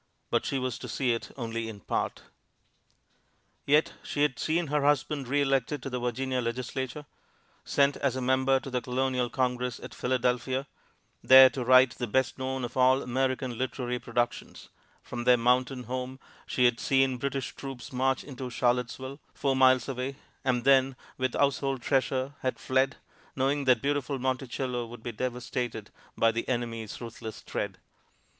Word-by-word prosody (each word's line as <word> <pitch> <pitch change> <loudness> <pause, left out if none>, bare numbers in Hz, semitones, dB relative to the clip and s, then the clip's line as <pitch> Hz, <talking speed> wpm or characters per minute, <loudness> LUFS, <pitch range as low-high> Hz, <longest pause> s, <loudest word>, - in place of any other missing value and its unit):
But - - +1
she 135 - 0
was 130 -2 -2
to - - -7
see 130 -3 0
it 115 - -4
only 115 -2 -3
in 105 -2 -8
part. - - -2 1.4
Yet 150 +2 +4
she 145 - -1
had 140 -4 +1
seen 165 +2 +1
her 150 0 0
husband 145 -1 +1
re 145 +3 +2
elected 135 0 0
to 135 - -5
the 125 - -2
Virginia 125 +1 -1
Legislature; 130 +4 -4 0.6
sent 140 0 +2
as 135 -3 0
a - - -2
member 130 +1 +3
to 135 - -8
the 125 -1 0
Colonial 125 0 0
Congress 125 -1 -1
at - - -9
Philadelphia, 125 +1 0 0.6
there 130 0 +9
to 130 - -3
write 130 0 +6
the 120 - -4
best 130 +4 0
known 130 -1 -2
of 120 - -8
all 130 +1 +4
American 130 -1 -1
literary 125 -1 -2
productions; 120 0 -3 0.3
from 120 - -5
their 125 0 +6
mountain 125 +2 +1
home 130 +2 -5 0.3
she 125 - +2
had 120 -1 +3
seen 135 -1 +2
British 135 +1 -3
troops 135 -2 -8
march 130 +1 +1
into 130 -2 -7
Charlottesville, 125 +3 -1 0.2
four 135 -2 0
miles 130 -2 +5
away, 135 0 -3 0.3
and 125 -3 +1
then, 135 -1 +4 0.2
with 130 -1 0
household 135 -2 +1
treasure, 135 0 0
had 130 - -2
fled, 130 +1 +1 0.4
knowing 140 +2 +1
that 125 -4 +4
beautiful 140 -1 0
Monticello 130 -1 -2
would 115 -1 -11
be 120 - -3
devastated 120 -2 -4 0.3
by 115 - +4
the 115 +1 -3
enemy's 115 -3 -3
ruthless 115 -2 -8
tread. - - -4
130 Hz, 160 wpm, -28 LUFS, 125-135 Hz, 1.4 s, there